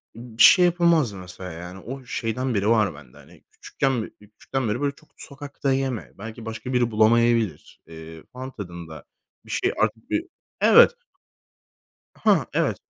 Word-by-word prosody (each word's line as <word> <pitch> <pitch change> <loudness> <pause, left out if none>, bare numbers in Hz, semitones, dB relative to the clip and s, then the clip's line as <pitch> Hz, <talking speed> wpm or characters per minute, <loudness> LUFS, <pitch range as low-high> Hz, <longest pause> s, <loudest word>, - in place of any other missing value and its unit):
bir 115 -1 0
şey 180 -2 +8
yapamazdım 170 - +2
mesela 90 0 -9
yani 90 +3 -9
o 130 +6 -8
şeyden 125 +2 -2
beri 100 0 +1
var 110 -6 +3
bende 70 -4 -15
hani - - -18
küçükken 135 -3 -2
beri - - -10
küçüklükten 110 +4 -5
beri 115 +6 -2
böyle 140 -1 -1
çok 155 - -23
sokakta 140 -1 -4
yeme 130 -4 -3
belki 110 +3 -9
başka 110 +3 -6
biri 120 -2 +1
bulamayabilir, 110 -4 +2
eee, 80 0 -11
falan 130 +1 -7
tadında 85 -7 -9 0.4
bir - - -10
şey - - 0
artık 110 +1 -1
bir 330 - -1 0.4
Evet. 480 - +7 1.2
Hah, - - +2
evet, - - +1
115 Hz, 155 wpm, -24 LUFS, 95-130 Hz, 1.2 s, şey